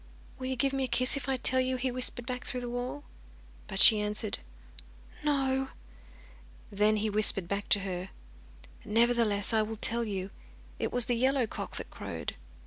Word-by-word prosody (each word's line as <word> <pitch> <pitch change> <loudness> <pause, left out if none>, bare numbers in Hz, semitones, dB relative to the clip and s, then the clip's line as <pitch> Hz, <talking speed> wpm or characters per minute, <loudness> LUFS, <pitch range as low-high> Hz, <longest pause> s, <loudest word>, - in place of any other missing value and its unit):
'Will 255 - -4
you 260 - -1
give 270 +3 +1
me 270 -1 0
a - - 0
kiss 255 +2 +2
if 270 -1 -4
I 265 - +1
tell 260 +1 +4
you?' 255 0 +1
he 255 +1 -1
whispered 245 -1 -1
back 250 0 -4
through 250 - -4
the 245 - -5
wall. 245 - -4 0.6
But 195 - -5
she 215 -1 +9
answered 210 0 -2 0.8
'No.' 270 -2 +1 1.0
Then 210 +2 +3
he 215 +1 0
whispered 200 -3 +3
back 200 +2 -3
to 205 - +4
her: 185 -1 -4 0.7
'Nevertheless, 225 -1 +2
I 220 - +4
will 220 +1 -3
tell 230 +2 +1
you. 195 -3 -4 0.5
It - - -1
was 245 -2 +2
the 245 - 0
yellow 260 +1 +2
cock - - -6
that - - -4
crowed. - - -5
235 Hz, 180 wpm, -30 LUFS, 210-255 Hz, 1.0 s, she